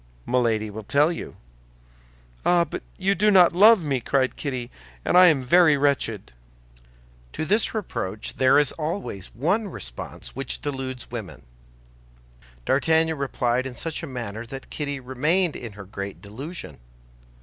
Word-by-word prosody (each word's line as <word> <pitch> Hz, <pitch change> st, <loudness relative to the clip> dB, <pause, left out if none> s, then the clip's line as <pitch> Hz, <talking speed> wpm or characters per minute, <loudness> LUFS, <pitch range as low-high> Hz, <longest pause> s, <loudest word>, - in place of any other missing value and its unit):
"Milady 115 Hz, -4 st, +1 dB
will 110 Hz, +2 st, -7 dB
tell 145 Hz, +9 st, +3 dB
you." 170 Hz, -, -7 dB, 1.1 s
"Ah, 175 Hz, -1 st, +4 dB, 0.3 s
you 195 Hz, +1 st, +2 dB
do 210 Hz, +3 st, +2 dB
not 185 Hz, -4 st, +6 dB
love 210 Hz, +1 st, +7 dB
me!" 135 Hz, -4 st, -1 dB
cried 130 Hz, +1 st, 0 dB
Kitty, 130 Hz, -4 st, -4 dB, 0.3 s
"and -, -, +1 dB
I 180 Hz, 0 st, +9 dB
am 145 Hz, -6 st, +3 dB
very 155 Hz, +2 st, +5 dB
wretched." 135 Hz, -, 0 dB, 1.0 s
To 155 Hz, -, -3 dB
this 210 Hz, +6 st, +1 dB
reproach 110 Hz, -, -4 dB
there 130 Hz, +1 st, +5 dB
is 145 Hz, -2 st, +4 dB
always 155 Hz, -, -4 dB
one 185 Hz, -, 0 dB
response -, -, -7 dB
which 135 Hz, 0 st, -3 dB
deludes 130 Hz, -4 st, -5 dB
women. 110 Hz, -6 st, -7 dB, 1.2 s
D'Artagnan 160 Hz, +3 st, +2 dB
replied 130 Hz, -2 st, 0 dB
in 125 Hz, -, -8 dB
such 160 Hz, +3 st, -3 dB
a 165 Hz, -, -6 dB
manner 115 Hz, -4 st, -5 dB
that 135 Hz, +2 st, -9 dB
Kitty 145 Hz, -2 st, -3 dB
remained 150 Hz, +7 st, +1 dB
in 115 Hz, -4 st, -7 dB
her 100 Hz, -1 st, -10 dB
great 100 Hz, 0 st, -7 dB
delusion. 110 Hz, -, -7 dB
135 Hz, 140 wpm, -24 LUFS, 120-165 Hz, 1.2 s, I